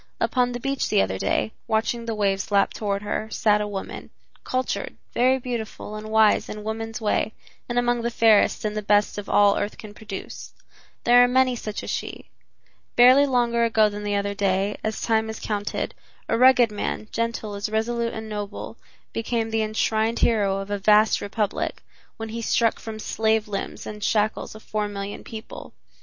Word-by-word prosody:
Upon 250 Hz, -1 st, +1 dB
the 245 Hz, -, -4 dB
beach 275 Hz, +1 st, -1 dB
the -, -, +4 dB
other 95 Hz, 0 st, -3 dB
day, 105 Hz, +2 st, 0 dB, 0.2 s
watching 230 Hz, +2 st, 0 dB
the 225 Hz, -1 st, -2 dB
waves 195 Hz, -2 st, 0 dB
lap 200 Hz, -1 st, +2 dB
toward 200 Hz, -1 st, -2 dB
her, 215 Hz, +1 st, -3 dB
sat 210 Hz, -2 st, +2 dB
a 210 Hz, -, -2 dB
woman, 200 Hz, -2 st, -6 dB, 0.3 s
cultured, 255 Hz, 0 st, -2 dB, 0.2 s
very 255 Hz, +2 st, +3 dB
beautiful 235 Hz, -4 st, -5 dB
and 215 Hz, 0 st, -7 dB
wise 220 Hz, -1 st, +4 dB
in 210 Hz, 0 st, -6 dB
woman's 225 Hz, +1 st, -4 dB
way 215 Hz, 0 st, 0 dB, 0.4 s
and 240 Hz, -, -2 dB
among 240 Hz, 0 st, +2 dB
the 235 Hz, -, -1 dB
fairest 225 Hz, -2 st, +3 dB
and 210 Hz, 0 st, -2 dB
the 215 Hz, -, -1 dB
best 205 Hz, 0 st, +2 dB
of 205 Hz, -, -8 dB
all 205 Hz, -1 st, +5 dB
earth 205 Hz, -, -3 dB
can 215 Hz, -2 st, -10 dB
produce. 210 Hz, -2 st, -8 dB, 0.5 s
There 245 Hz, +1 st, +7 dB
are -, -, +5 dB
many 255 Hz, 0 st, +3 dB
such 215 Hz, -2 st, -5 dB
as -, -, -4 dB
she. -, -, -5 dB, 0.6 s
Barely 255 Hz, +4 st, +7 dB
longer 240 Hz, -2 st, +2 dB
ago 220 Hz, -2 st, +4 dB
than 205 Hz, 0 st, -6 dB
the 205 Hz, 0 st, -1 dB
other 200 Hz, 0 st, -1 dB
day, 200 Hz, 0 st, 0 dB
as 220 Hz, 0 st, -2 dB
time 220 Hz, -1 st, +1 dB
is 220 Hz, -, -6 dB
counted, 205 Hz, -1 st, -3 dB, 0.3 s
a -, -, +1 dB
rugged 245 Hz, -1 st, +6 dB
man, 210 Hz, +1 st, -3 dB
gentle 230 Hz, -2 st, -2 dB
as 200 Hz, +1 st, -3 dB
resolute 230 Hz, +2 st, -1 dB
and 220 Hz, 0 st, -6 dB
noble, 205 Hz, -1 st, -6 dB, 0.4 s
became 225 Hz, 0 st, -2 dB
the 225 Hz, 0 st, +1 dB
enshrined 220 Hz, +1 st, 0 dB
hero 205 Hz, -4 st, +2 dB
of 195 Hz, +1 st, -6 dB
a 205 Hz, -, -1 dB
vast 210 Hz, +2 st, +4 dB
republic, 205 Hz, 0 st, -2 dB, 0.3 s
when 225 Hz, -1 st, -5 dB
he 230 Hz, +1 st, -5 dB
struck 230 Hz, 0 st, +1 dB
from 220 Hz, -1 st, -7 dB
slave 220 Hz, 0 st, 0 dB
limbs 200 Hz, -1 st, -5 dB
the 210 Hz, 0 st, -8 dB
shackles 215 Hz, +1 st, 0 dB
of 220 Hz, -, -12 dB
four 210 Hz, -1 st, -2 dB
million 200 Hz, 0 st, -6 dB
people. 220 Hz, 0 st, -9 dB
220 Hz, 185 wpm, -24 LUFS, 205-230 Hz, 0.6 s, There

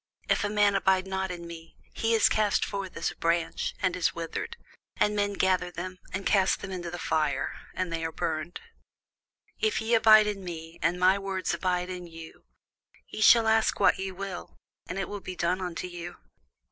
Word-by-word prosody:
If -, -, +2 dB
a 205 Hz, -, 0 dB
man 205 Hz, -1 st, +3 dB
abide 190 Hz, -1 st, +2 dB
not 190 Hz, 0 st, -2 dB
in 175 Hz, -1 st, -6 dB
me, 165 Hz, -1 st, -10 dB, 0.2 s
he 225 Hz, 0 st, +1 dB
is 220 Hz, -, +5 dB
cast 210 Hz, -2 st, +2 dB
forth 195 Hz, -2 st, -5 dB
as 165 Hz, -, -1 dB
a -, -, -13 dB
branch, 170 Hz, 0 st, -1 dB
and 185 Hz, -1 st, +2 dB
is 180 Hz, -, 0 dB
withered; 170 Hz, -, -5 dB, 0.4 s
and 210 Hz, 0 st, +2 dB
men 205 Hz, 0 st, 0 dB
gather 185 Hz, -2 st, +1 dB
them, 185 Hz, +1 st, -7 dB
and 190 Hz, +1 st, -4 dB
cast 190 Hz, -2 st, +3 dB
them 195 Hz, -, -6 dB
into 175 Hz, -2 st, -4 dB
the 175 Hz, -, -6 dB
fire, 155 Hz, -4 st, 0 dB, 0.2 s
and 180 Hz, -2 st, -2 dB
they 165 Hz, 0 st, -2 dB
are 165 Hz, -, -2 dB
burned. 160 Hz, +1 st, -3 dB, 1.0 s
If 435 Hz, -1 st, +1 dB
ye 225 Hz, +1 st, -1 dB
abide 220 Hz, -1 st, +7 dB
in 205 Hz, -2 st, -3 dB
me, 165 Hz, -2 st, -8 dB
and 170 Hz, +3 st, +1 dB
my 185 Hz, +2 st, +4 dB
words 195 Hz, -1 st, -2 dB
abide 180 Hz, -1 st, -1 dB
in 180 Hz, -1 st, -6 dB
you, 165 Hz, -1 st, -12 dB, 0.6 s
ye -, -, -6 dB
shall 225 Hz, +1 st, +7 dB
ask 220 Hz, 0 st, +3 dB
what 200 Hz, -, +4 dB
ye 190 Hz, 0 st, -3 dB
will, 190 Hz, -1 st, -7 dB, 0.3 s
and 185 Hz, -, -5 dB
it 195 Hz, -, 0 dB
shall 205 Hz, -, -5 dB
be 185 Hz, -1 st, -7 dB
done 175 Hz, +2 st, 0 dB
unto 180 Hz, -1 st, -4 dB
you. 175 Hz, -1 st, -7 dB
185 Hz, 195 wpm, -28 LUFS, 170-200 Hz, 1.0 s, abide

